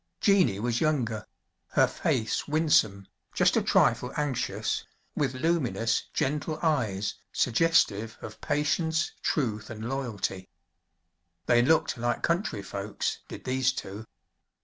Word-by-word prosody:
Jeannie 185 - +3
was 120 +1 -1
younger; 120 -9 0 0.5
her - - +5
face 110 - -1
winsome, 145 -11 +2 0.3
just - - +3
a - - +3
trifle 125 - +2
anxious, 145 -5 -1 0.3
with 135 -3 0
luminous, 130 -7 0
gentle 150 +3 -1
eyes, 110 - 0 0.2
suggestive 115 -6 +2
of 110 0 -10
patience, 160 +3 0
truth 110 -7 -1
and 110 0 -6
loyalty. 105 -8 -3 1.0
They 120 -1 +4
looked 155 -2 +2
like 120 0 -1
country 170 - 0
folks, 100 +1 -3
did - - -9
these 130 0 +1
two. 110 -3 -7
125 Hz, 115 wpm, -28 LUFS, 110-150 Hz, 1.0 s, her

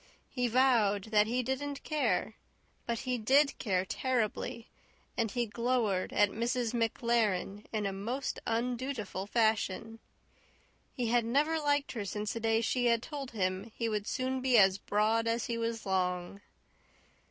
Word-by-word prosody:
He 250 -2 0
vowed 225 -5 +3
that 210 -1 +4
he 250 +2 0
didn't 275 +3 -3
care; 305 -1 0 0.5
but 235 -1 -1
he 250 -2 -2
DID 275 +6 +3
care 190 -4 0
terribly, 235 0 -2 0.5
and 225 -2 0
he 240 +4 -1
glowered 230 -4 0
at 205 -1 +3
Mrs. 235 +1 -1
MacLaren 225 -4 0
in 215 -2 -1
a 195 - -1
most 235 +8 -3
undutiful 235 -4 -2
fashion. 225 0 0 0.9
He 245 -4 -2
had 240 0 +3
never 295 +8 +1
liked 290 -1 +1
her 225 -4 -4
since 210 +1 -3
the 230 - -4
day 225 0 +2
she 245 +1 +1
had 235 0 +2
told 285 -4 -6
him 190 +1 -2
he 230 - -1
would 210 -1 -2
soon 260 0 -1
be 255 -2 +4
as 195 -1 +5
broad 220 +3 +1
as 230 0 0
he 235 - -2
was 230 -1 -3
long. 180 0 -1
230 Hz, 155 wpm, -31 LUFS, 210-250 Hz, 0.9 s, as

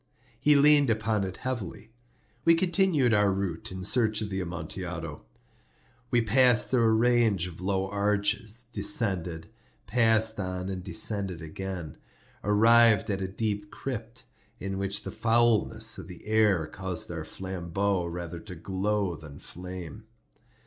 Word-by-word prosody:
He 150 0 +4
leaned 145 -1 +5
upon 110 -2 0
it 95 -1 -5
heavily. 120 -4 -5 0.5
We 165 - +6
continued 170 - +2
our 105 -1 +3
route 95 -4 -3
in 95 0 -6
search 110 +1 +2
of 105 -1 -4
the 95 0 -2
Amontillado. 85 -2 -6 0.9
We 120 -1 +2
passed 125 +2 +4
through 120 -3 +3
a - - +4
range 110 -5 +3
of 90 -1 -8
low 95 0 -1
arches, 105 +3 -1
descended, 100 - 0 0.3
passed 110 -2 +3
on, 90 0 -4
and 95 -2 -5
descending 100 -3 -1
again, 90 -1 -6 0.5
arrived 110 +1 +5
at 95 -1 -2
a 95 - -2
deep 105 +1 -3
crypt, 115 -2 -6 0.4
in 95 0 -4
which 100 +1 -2
the - - -5
foulness 115 -1 +2
of - - -9
the 90 - -11
air 105 -6 +2
caused 90 -1 -4
our 80 -2 -5
flambeaux 95 +2 -2
rather 85 0 -6
to 90 0 -10
glow 95 +1 -2
than 75 -2 -12
flame. 90 +5 -9
100 Hz, 140 wpm, -27 LUFS, 90-115 Hz, 0.9 s, We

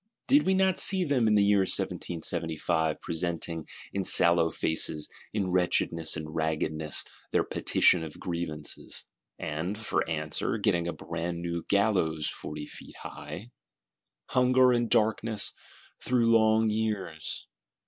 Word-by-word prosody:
Did 285 -3 +4
we 190 - +3
not 190 -1 +2
see 190 -1 +4
them, 135 -8 +1
in 105 - +4
the 105 - +5
year 100 0 +4
1775, 80 -3 -1
presenting, 85 -1 -3 0.3
in 100 - -1
sallow 85 -2 +5
faces, 80 -1 0 0.2
in 100 -4 -1
wretchedness 85 -3 +1
and 75 -1 -7
raggedness, 80 -1 0 0.3
their - - +2
Petition 85 -3 +3
of 80 -2 -9
Grievances; 85 -4 -5 0.3
and, 80 +6 -4
for 110 - -1
answer, 75 +6 -1
getting 95 -5 +1
a 85 - -2
brand 85 +1 -5
new 85 -1 -3
Gallows 95 -7 +1
forty 75 0 -5
feet - - -11
high? 115 +5 -8 0.8
Hunger 130 0 +4
and 120 -1 +1
Darkness, 110 0 +1 0.5
through 120 -2 +2
long 110 0 +3
years! 105 -8 -3
90 Hz, 130 wpm, -28 LUFS, 80-110 Hz, 0.8 s, the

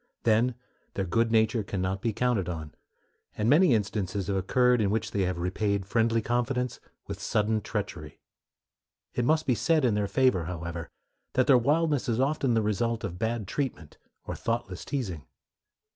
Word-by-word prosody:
Then 115 +2 +3 0.4
their 95 - -1
good 115 +6 +1
nature 110 +1 +3
can 100 -1 -4
not 95 +1 -1
be 115 - 0
counted 110 -5 0
on; 80 -3 -6 0.6
and 105 - 0
many 150 0 +5
instances 100 -2 -2
have 100 +1 -1
occurred 125 +5 +3
in 100 - +2
which 110 +1 -1
they 100 - 0
have 90 -1 -2
repaid 100 +3 -1
friendly 115 +2 +1
confidence 125 +1 -1 0.3
with - - -7
sudden 105 +1 +1
treachery. - - -5 0.9
It 120 - 0
must 155 +3 +2
be 130 - +3
said 155 +4 +2
in 120 - +3
their 105 -1 0
favor, 125 -8 +2
however, 85 -2 -5 0.4
that 130 - +3
their 135 - +6
wildness 145 +1 +1
is 115 0 0
often 135 -3 +1
the 110 - +2
result 115 +2 -1
of 90 -3 -5
bad 110 -2 -1
treatment 130 - -4 0.3
or - - -4
thoughtless 115 -6 -3
teasing. 100 - -4
110 Hz, 170 wpm, -28 LUFS, 95-125 Hz, 0.9 s, their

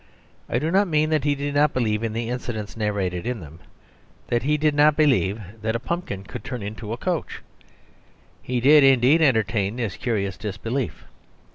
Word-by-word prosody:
I - - 0
do 155 +6 -1
not 195 +2 +3
mean 155 -1 +1
that 155 -2 +1
he 145 -1 +2
did 145 0 -3
not 145 +1 +2
believe 110 -4 0
in 115 -2 -2
the 115 +1 -3
incidents 120 -4 -5
narrated 100 -3 -2
in 125 -2 -2
them 80 -1 -12 0.7
that 120 0 +1
he 150 +2 +1
did 150 0 +2
not 150 +1 +4
believe 130 -9 +2 0.2
that 110 +1 -1
a - - 0
pumpkin 135 - -4
could 125 +3 -8
turn 125 -4 -5
into 105 +1 -6
a 115 - -3
coach. 175 +2 -3 1.0
He 125 0 -2
did, 145 +4 +6
indeed, 135 +4 +5
entertain 110 -7 +2
this 115 -6 -3
curious 100 -6 -2
disbelief. 115 +5 -4
120 Hz, 180 wpm, -23 LUFS, 105-145 Hz, 1.0 s, did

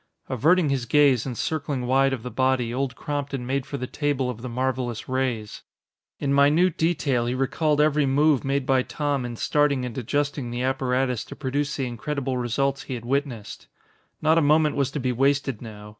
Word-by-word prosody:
Averting 155 +6 +3
his 130 -3 -1
gaze 140 -3 +4
and 125 -3 -4
circling 140 -5 -2
wide 135 +2 +3
of 130 -4 -3
the 125 - -6
body, 130 -1 +1
Old 130 0 -2
Crompton 140 -3 -4
made 135 +1 -2
for 140 - -4
the 125 - -3
table 135 -2 -1
of 115 -2 -10
the 125 - -5
marvelous 125 -1 -2
rays. 125 -5 -2 0.6
In 140 -1 -1
minute 150 +5 +4
detail 145 -7 +1
he 125 - -1
recalled 150 +3 +1
every 150 -1 +3
move 145 0 +3
made 135 0 0
by 130 0 +3
Tom 140 -1 -2
in 120 -1 -5
starting 140 +1 +1
and 120 -3 -6
adjusting 140 +1 -2
the 120 +1 -3
apparatus 130 -2 0
to - - -9
produce 145 +1 -2
the 135 - -2
incredible 130 +2 -3
results 135 +3 0
he 130 - -5
had 120 -1 -8
witnessed. 120 -6 -3 0.6
Not 160 +2 +5
a - - +2
moment 150 0 +3
was 140 -2 +1
to 145 - -4
be 130 -1 0
wasted 135 -1 +1
now. 105 -3 -9
135 Hz, 190 wpm, -24 LUFS, 125-145 Hz, 0.6 s, Not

